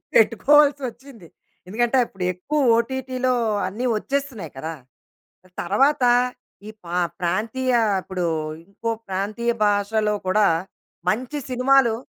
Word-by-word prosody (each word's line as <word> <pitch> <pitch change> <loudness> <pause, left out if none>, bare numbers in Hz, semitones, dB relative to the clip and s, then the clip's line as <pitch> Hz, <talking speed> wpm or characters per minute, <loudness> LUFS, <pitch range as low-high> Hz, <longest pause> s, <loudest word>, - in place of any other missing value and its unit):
పెట్టుకోవాల్సొచ్చింది. 265 - +2 0.4
ఎందుకంటే 240 +6 +1
అప్పుడు 190 -4 -8
ఎక్కువ 285 +13 -2 0.2
ఓటీటీలో 255 +1 -1 0.3
అన్ని 215 +7 -4
ఒచ్చేస్తున్నాయి 270 - -3
కదా! 160 +4 -4 0.9
తరువాత 270 +10 +2 0.6
ఈ - - -6 0.2
పా 175 +1 -3 0.2
ప్రాంతీయ 225 +9 -1 0.3
ఇప్పుడు 185 -2 -3 0.4
ఇంకో 230 +3 -4 0.2
ప్రాంతీయ 210 +5 -1
భాషలో 210 +1 +1
కూడా 205 +2 +4 0.6
మంచి 255 +7 -2
సినిమాలు 255 -2 +3
230 Hz, 95 wpm, -22 LUFS, 200-265 Hz, 0.9 s, కూడా